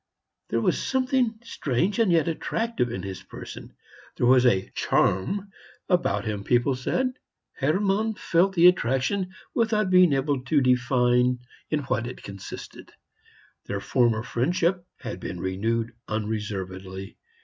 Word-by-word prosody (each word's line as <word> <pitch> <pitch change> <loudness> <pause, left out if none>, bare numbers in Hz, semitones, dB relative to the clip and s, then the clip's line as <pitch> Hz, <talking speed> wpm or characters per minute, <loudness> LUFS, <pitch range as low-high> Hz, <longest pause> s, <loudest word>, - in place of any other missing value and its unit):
There - - 0
was - - +1
something 255 -3 +1
strange 175 - -1
and 220 -5 +4
yet 165 -2 +3
attractive 170 - -1
in - - -4
his 95 -1 -6
person; - - -10 0.4
there - - +1
was 125 0 +6
a 95 -5 +1
"charm" 195 - +1 0.4
about 105 - +1
him, 105 -2 -3
people 120 +4 +2
said. 255 - -1 0.4
Hermann 195 +9 +1
felt 190 +1 +2
the 170 0 +5
attraction 180 +3 +3 0.2
without 215 -4 +1
being 180 -4 +6
able 135 -1 0
to 145 +2 +3
define 125 -1 +3 0.3
in 155 -1 0
what 120 -4 -1
it 125 - -9
consisted. 100 -1 -9 0.8
Their - - -2
former 115 -3 +2
friendship 170 +9 0
had - - -6
been 90 - -6
renewed 110 +6 -1
unreservedly. 95 -3 -4
130 Hz, 130 wpm, -26 LUFS, 110-185 Hz, 0.8 s, was